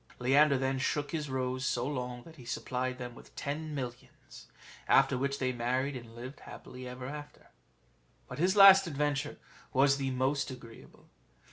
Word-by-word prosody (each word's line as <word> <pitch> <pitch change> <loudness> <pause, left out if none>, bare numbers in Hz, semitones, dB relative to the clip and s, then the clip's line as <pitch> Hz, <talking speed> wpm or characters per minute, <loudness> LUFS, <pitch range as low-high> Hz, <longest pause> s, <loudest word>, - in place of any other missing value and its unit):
Leander 140 +3 +4
then 130 0 -1
shook 145 +1 -1
his 150 -3 -3
rose 130 -1 -2
so 125 -2 0
long, 125 -3 -4
that 165 -1 -15
he 125 - -12
supplied 125 +1 -3
them 125 -1 -6
with - - -16
ten 150 +2 -4
millions; 125 -3 -8 0.4
after - - +5
which 140 +2 -1
they 130 -2 0
married, 130 +3 -1
and 115 -2 -9
lived 130 +4 -8
happily 125 0 -10
together. 130 +4 -8 0.8
But 125 - -8
his 185 +4 +2
last 195 -1 +9
adventure 145 -1 -1 0.4
was 135 +1 +4
the 135 -1 -1
most 135 +2 0
agreeable. 120 -3 -13
130 Hz, 155 wpm, -31 LUFS, 125-145 Hz, 0.8 s, last